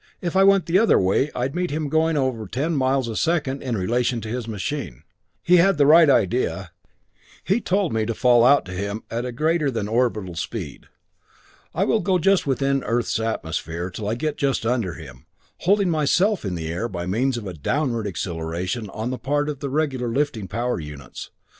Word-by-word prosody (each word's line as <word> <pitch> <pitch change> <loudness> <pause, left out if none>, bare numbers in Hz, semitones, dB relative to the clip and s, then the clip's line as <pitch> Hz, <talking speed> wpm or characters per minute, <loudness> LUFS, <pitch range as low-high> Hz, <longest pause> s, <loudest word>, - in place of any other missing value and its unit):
If 175 0 -4
I 190 - +5
went 195 -1 +5
the 175 +3 +3
other 225 - +4
way 95 +10 +2
I'd 125 +2 -2
meet 180 0 -1
him 150 +1 -2
going 160 +2 +1
at - - +2
over 120 -5 -2
10 145 - -2
miles 130 -2 +1
a 115 - -4
second 145 -4 0
in 125 -4 -2
relation 120 +5 0
to 110 - -6
his 120 0 -4
machine. 90 - -5 0.4
He 180 +1 +5
had 185 0 +4
the 145 - +4
right 160 +1 +7
idea. 100 -6 +1 0.7
He 200 +7 +1
told 190 - 0
me 110 -1 0
to 115 - -2
fall 120 -1 +4
out 140 +3 +5
to 90 - -9
him 100 +4 -4
at 120 +2 -2
a 125 - -3
greater 155 +3 +1
than 110 -5 -3
orbital 110 -5 0
speed. 85 - -6 0.9
I - - +2
will 225 - +2
go 185 0 +1
just 195 -1 +2
within 135 0 +1
the - - -9
Earth's 115 -1 0
atmosphere 85 -5 -3
till 105 +2 -4
I 110 - 0
get 150 +5 -3
just 135 -5 0
under 115 -8 0
him, 65 -7 -12 0.3
holding 195 -1 +2
myself 170 - +2
in 95 -2 -2
the 80 -2 -5
air 90 +9 -3
by 85 -2 -5
means 120 +7 0
of 115 - -6
a 95 - -5
downward 115 - -1
acceleration 90 +4 -4
on 110 +5 -4
the 130 - -4
part 145 +4 0
of 145 -3 -5
the 140 - -4
regular 135 -4 -1
lifting 120 -4 -1
power 120 +2 -2
units. 75 -3 -9
125 Hz, 205 wpm, -23 LUFS, 105-150 Hz, 0.9 s, right